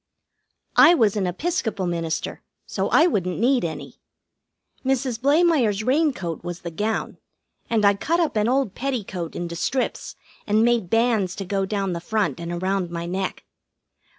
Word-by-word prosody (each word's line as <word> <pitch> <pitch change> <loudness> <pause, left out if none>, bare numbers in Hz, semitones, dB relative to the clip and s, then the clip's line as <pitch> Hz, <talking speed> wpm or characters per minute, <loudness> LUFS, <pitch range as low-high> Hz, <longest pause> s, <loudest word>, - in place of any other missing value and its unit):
I 345 - +8
was 220 - +3
an 195 -3 0
Episcopal 220 - -2
minister, 165 -2 -3 0.2
so - - -2
I 320 - +5
wouldn't 185 - 0
need 245 +2 +2
any. 165 -2 -5 0.9
Mrs. 260 -3 0
Blamire's 280 - +3
raincoat 255 - 0
was 175 0 -6
the 170 - -6
gown, 215 +6 -2 0.5
and 220 -3 +2
I 200 - +6
cut 330 - 0
up 330 -7 0
an 210 0 +2
old 260 -6 +1
petticoat 205 -11 -4
into 170 -1 -4
strips, 255 +9 -2 0.3
and 215 +2 +3
made 235 -6 +1
bands 225 -5 +2
to 195 - -5
go 195 0 -1
down 195 -2 -1
the 170 - -4
front 210 -1 -1
and 170 0 -5
around 185 +1 -1
my 170 0 -4
neck. 185 +2 -3
205 Hz, 155 wpm, -23 LUFS, 180-255 Hz, 0.9 s, I